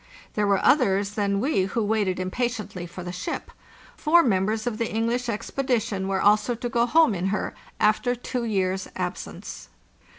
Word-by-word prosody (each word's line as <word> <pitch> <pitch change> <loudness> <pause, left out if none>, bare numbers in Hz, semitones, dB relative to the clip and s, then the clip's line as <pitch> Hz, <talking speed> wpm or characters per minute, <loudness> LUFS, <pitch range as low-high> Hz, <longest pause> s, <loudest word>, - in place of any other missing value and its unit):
There 210 -1 +1
were 200 -1 +3
others 200 -8 +3
than 200 -1 0
we 230 -6 +1
who 220 +4 -1
waited 205 -3 0
impatiently 210 -2 -3
for 175 +1 -8
the 175 - -5
ship. 180 +1 -5 0.4
Four 335 +2 +4
members 215 -1 +1
of 235 -3 -2
the 230 - -1
English 235 +2 0
expedition 220 -3 -1
were 195 -1 0
also 210 +4 +3
to 240 +1 -4
go 240 -1 +2
home 320 -3 +5
in 185 0 -1
her, 200 +1 -2 0.3
after 215 +4 +2
two 245 0 -4
years' 190 -4 -1
absence. 65 - -6
215 Hz, 165 wpm, -25 LUFS, 195-240 Hz, 0.4 s, home